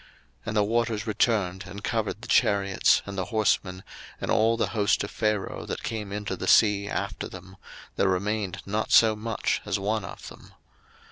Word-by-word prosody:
02:014:028 -, -, -23 dB, 0.4 s
And 110 Hz, 0 st, -1 dB
the 105 Hz, -, +4 dB
waters 115 Hz, 0 st, 0 dB
returned, 100 Hz, -4 st, 0 dB
and 100 Hz, +3 st, -9 dB
covered 110 Hz, -1 st, -2 dB
the -, -, -7 dB
chariots, 100 Hz, -1 st, +3 dB
and 100 Hz, -, -7 dB
the 95 Hz, -, -1 dB
horsemen, 95 Hz, -3 st, 0 dB, 0.4 s
and -, -, -3 dB
all 115 Hz, +1 st, +3 dB
the -, -, 0 dB
host 105 Hz, -3 st, +1 dB
of 100 Hz, -, -6 dB
Pharaoh 105 Hz, -3 st, -2 dB
that -, -, -5 dB
came 105 Hz, -3 st, -4 dB
into 100 Hz, -1 st, -3 dB
the 95 Hz, -, -5 dB
sea 100 Hz, -1 st, +4 dB
after 100 Hz, 0 st, -3 dB
them; 95 Hz, 0 st, -11 dB, 0.4 s
there 95 Hz, -, +3 dB
remained 100 Hz, +1 st, -2 dB
not 105 Hz, +2 st, -2 dB
so 110 Hz, -1 st, +6 dB
much 110 Hz, +1 st, -2 dB
as -, -, -1 dB
one 105 Hz, +2 st, -1 dB
of -, -, -9 dB
them. -, -, -15 dB
105 Hz, 185 wpm, -26 LUFS, 100-110 Hz, 0.4 s, so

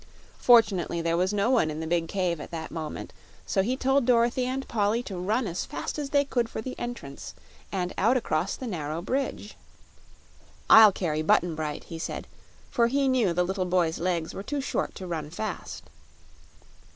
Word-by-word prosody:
Fortunately, 205 Hz, -8 st, +4 dB
there 165 Hz, 0 st, 0 dB
was 185 Hz, +3 st, +1 dB
no 205 Hz, +4 st, +1 dB
one 225 Hz, -11 st, +3 dB
in 155 Hz, 0 st, -4 dB
the 160 Hz, -, -3 dB
big 165 Hz, 0 st, 0 dB
cave 175 Hz, -4 st, -1 dB
at -, -, -8 dB
that 160 Hz, -2 st, -6 dB
moment, 155 Hz, -2 st, -6 dB, 0.3 s
so 195 Hz, -, +1 dB
he 245 Hz, +7 st, -1 dB
told 270 Hz, +1 st, +2 dB
Dorothy 240 Hz, +1 st, +3 dB
and 265 Hz, +1 st, -3 dB
Polly 220 Hz, +2 st, +1 dB
to 200 Hz, -, -6 dB
run 210 Hz, +8 st, 0 dB
as 175 Hz, -2 st, -3 dB
fast 300 Hz, -, -5 dB
as 285 Hz, -2 st, -3 dB
they 285 Hz, -1 st, +3 dB
could 240 Hz, -4 st, 0 dB
for -, -, -5 dB
the 255 Hz, +4 st, -5 dB
entrance, 235 Hz, -14 st, -7 dB, 0.4 s
and 180 Hz, -2 st, -2 dB
out 235 Hz, +6 st, +4 dB
across 180 Hz, -5 st, -1 dB
the 260 Hz, -, -7 dB
narrow 165 Hz, -6 st, -4 dB
bridge. 255 Hz, -3 st, -3 dB, 1.2 s
"I'll 220 Hz, -2 st, +10 dB
carry 155 Hz, -5 st, -1 dB
Button 165 Hz, +2 st, +3 dB
Bright," 155 Hz, -1 st, -4 dB
he 165 Hz, -, -8 dB
said, -, -, -4 dB, 0.5 s
for 235 Hz, -1 st, +3 dB
he 275 Hz, +3 st, +1 dB
knew 250 Hz, -8 st, +3 dB
the 180 Hz, +1 st, +1 dB
little 190 Hz, 0 st, -1 dB
boy's 175 Hz, -2 st, +1 dB
legs 170 Hz, -2 st, -1 dB
were -, -, -5 dB
too 285 Hz, +8 st, -3 dB
short 275 Hz, -, -2 dB
to 190 Hz, -, -7 dB
run 160 Hz, -4 st, -4 dB
fast. 210 Hz, +7 st, -5 dB
195 Hz, 190 wpm, -27 LUFS, 170-240 Hz, 1.2 s, I'll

